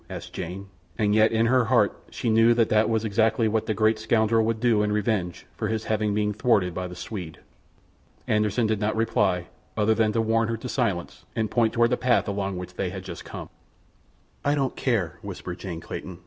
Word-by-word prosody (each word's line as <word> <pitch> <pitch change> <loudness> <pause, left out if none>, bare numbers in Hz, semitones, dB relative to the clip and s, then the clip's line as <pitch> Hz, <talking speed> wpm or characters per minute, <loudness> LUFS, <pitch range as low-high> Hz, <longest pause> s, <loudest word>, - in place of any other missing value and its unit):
asked - - -8
Jane, 95 +4 -6 0.3
and 105 -1 +2
yet 110 +1 +4
in 115 0 +2
her 125 0 +3
heart - - +3
she - - -5
knew 115 +1 +5
that 115 -2 +2
that 110 +1 +3
was 110 -1 0
exactly 110 +2 +2
what 110 0 0
the 110 - +1
great 110 0 +2
scoundrel 110 0 +2
would 110 0 -1
do 115 -3 +3
in 105 0 0
revenge 105 -4 -1
for 110 - -2
his 110 0 -2
having 110 -1 0
been 105 0 0
thwarted 100 -5 +2
by 90 +1 -3
the 90 - -9
Swede. 90 -6 -7 0.9
Anderssen 105 +2 +1
did 110 -1 0
not 105 0 0
reply, 100 -5 +1 0.3
other 110 +1 +3
than 110 -1 +2
to 115 - +1
warn 115 0 +2
her 115 0 -2
to 120 - -7
silence 110 -10 -2
and 110 -1 -1
point 115 -2 +2
toward 120 0 +3
the 125 - +2
path 125 -1 +2
along 100 -2 -2
which 90 0 -7
they 90 0 -2
had 95 0 -7
just 85 -3 -8
come. - - -8 1.0
"I 145 +1 +2
don't 135 -3 -1
care," 95 -10 -1
whispered 95 -3 -7
Jane 85 -4 -6
Clayton. 90 +1 -7
110 Hz, 210 wpm, -25 LUFS, 100-115 Hz, 1.0 s, knew